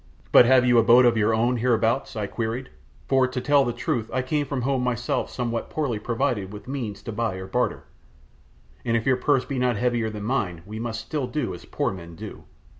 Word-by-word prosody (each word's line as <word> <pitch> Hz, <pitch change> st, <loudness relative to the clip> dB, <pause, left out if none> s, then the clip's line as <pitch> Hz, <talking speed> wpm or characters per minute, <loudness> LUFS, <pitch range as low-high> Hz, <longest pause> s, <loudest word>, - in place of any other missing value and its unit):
"But 120 Hz, -, +8 dB
have 130 Hz, -1 st, +5 dB
you 120 Hz, -1 st, +5 dB
a -, -, +4 dB
boat 120 Hz, +3 st, +6 dB
of 120 Hz, -1 st, +4 dB
your 110 Hz, 0 st, +2 dB
own 120 Hz, +3 st, +2 dB
hereabouts?" 115 Hz, +1 st, +1 dB
I 105 Hz, -2 st, -2 dB
queried; 115 Hz, +5 st, -4 dB, 0.4 s
"for 130 Hz, -1 st, +3 dB
to 130 Hz, 0 st, -4 dB
tell 145 Hz, +1 st, +4 dB
the 120 Hz, -, -1 dB
truth 120 Hz, -1 st, -2 dB
I 130 Hz, +1 st, -1 dB
came 145 Hz, +2 st, -1 dB
from 135 Hz, -3 st, -3 dB
home 135 Hz, 0 st, 0 dB
myself 120 Hz, -1 st, -1 dB
somewhat 120 Hz, -2 st, -3 dB
poorly 135 Hz, -9 st, -2 dB
provided 115 Hz, -4 st, -1 dB
with 105 Hz, +2 st, -10 dB
means 115 Hz, -7 st, -5 dB
to 115 Hz, -, -5 dB
buy 110 Hz, -2 st, -2 dB
or 95 Hz, 0 st, -6 dB
barter, 125 Hz, +6 st, -1 dB, 1.0 s
and 115 Hz, 0 st, +1 dB
if 115 Hz, -, -3 dB
your 130 Hz, -1 st, +3 dB
purse 135 Hz, 0 st, +2 dB
be 140 Hz, -3 st, -3 dB
not 125 Hz, -3 st, +1 dB
heavier 120 Hz, -1 st, 0 dB
than 105 Hz, -1 st, -7 dB
mine 100 Hz, -9 st, -2 dB
we 110 Hz, +2 st, -7 dB
must 115 Hz, -1 st, -4 dB
still 130 Hz, +3 st, -3 dB
do 145 Hz, -7 st, -2 dB
as 90 Hz, -, -10 dB
poor -, -, -1 dB
men 85 Hz, -3 st, -10 dB
do." -, -, -9 dB
120 Hz, 220 wpm, -24 LUFS, 110-130 Hz, 1.0 s, But